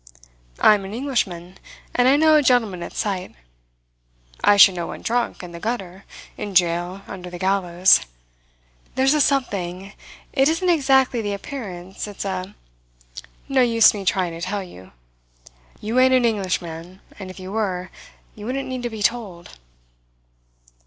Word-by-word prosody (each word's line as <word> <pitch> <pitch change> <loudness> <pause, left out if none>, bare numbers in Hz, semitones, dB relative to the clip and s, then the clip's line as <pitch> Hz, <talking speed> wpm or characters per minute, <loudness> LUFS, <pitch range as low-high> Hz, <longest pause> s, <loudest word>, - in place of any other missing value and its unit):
I - - +6
am 205 -2 -1
an 195 +3 -7
Englishman, 190 -9 -3 0.3
and 245 0 +3
I 265 - +6
know 315 +1 +4
a 305 - +6
gentleman 230 -9 +2
at - - -7
sight. 190 -3 -3 1.1
I 205 - +5
should 195 -1 +8
know 175 -2 -4
one - - -8
drunk, 240 -4 -1
in 175 - -9
the 170 - -9
gutter, 195 -3 -5 0.3
in 205 -2 -6
jail, 175 +2 +1
under 180 -2 -8
the 175 - -8
gallows. 185 -1 +3 1.0
There's 265 +2 +3
a 300 - +2
something 195 -9 -1 0.4
it 270 +1 +3
isn't 335 +3 0
exactly 265 -6 +3
the 205 -1 -3
appearance, 195 -6 -7
it's 205 -1 -7
a 190 +1 -4 0.9
no 270 -2 +2
use 230 -2 +5
me 205 -2 -5
trying 185 -2 0
to 165 0 -8
tell 195 +3 -3
you. 95 - -14 0.9
You 225 +4 -1
ain't 260 0 +5
an 250 -2 +3
Englishman, 185 -4 -3 0.2
and 190 -2 -7
if 185 - -10
you 185 +1 -8
were, 190 -4 -2 0.4
you 210 0 -9
wouldn't 270 +2 -3
need 255 -1 -4
to 240 - -3
be 220 -2 -6
told." 200 -7 -2
200 Hz, 160 wpm, -22 LUFS, 180-245 Hz, 1.1 s, should